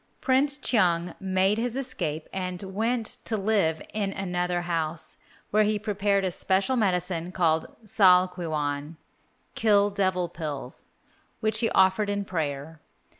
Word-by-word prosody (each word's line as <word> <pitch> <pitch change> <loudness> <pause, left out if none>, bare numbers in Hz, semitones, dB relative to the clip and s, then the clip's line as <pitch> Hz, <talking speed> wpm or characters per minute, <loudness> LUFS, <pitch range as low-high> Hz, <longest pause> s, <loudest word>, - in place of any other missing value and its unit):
Prince 275 +2 +3
Cheung 175 - +2
made 190 +2 +1
his 240 0 -2
escape 175 - -3
and 185 -1 -3
went 220 +4 -2
to 220 - -1
live 195 -6 +1
in 205 -2 -1
another 180 -2 -2
house, 165 -2 -2 0.3
where 215 - +4
he 210 0 +2
prepared 200 -2 0
a 185 - 0
special 195 +8 +1
medicine 180 -5 0
called 165 -3 +1 0.2
sal 185 -3 +5
kwi 180 -2 -6
whan 150 0 -3 0.6
(kill 205 -2 +3
devil 185 -3 0
pills), 150 -6 -7 0.5
which 215 0 +1
he 225 - +2
offered 190 +2 +3
in 200 0 -1
prayer. 155 -3 -4
190 Hz, 135 wpm, -26 LUFS, 170-210 Hz, 0.6 s, sal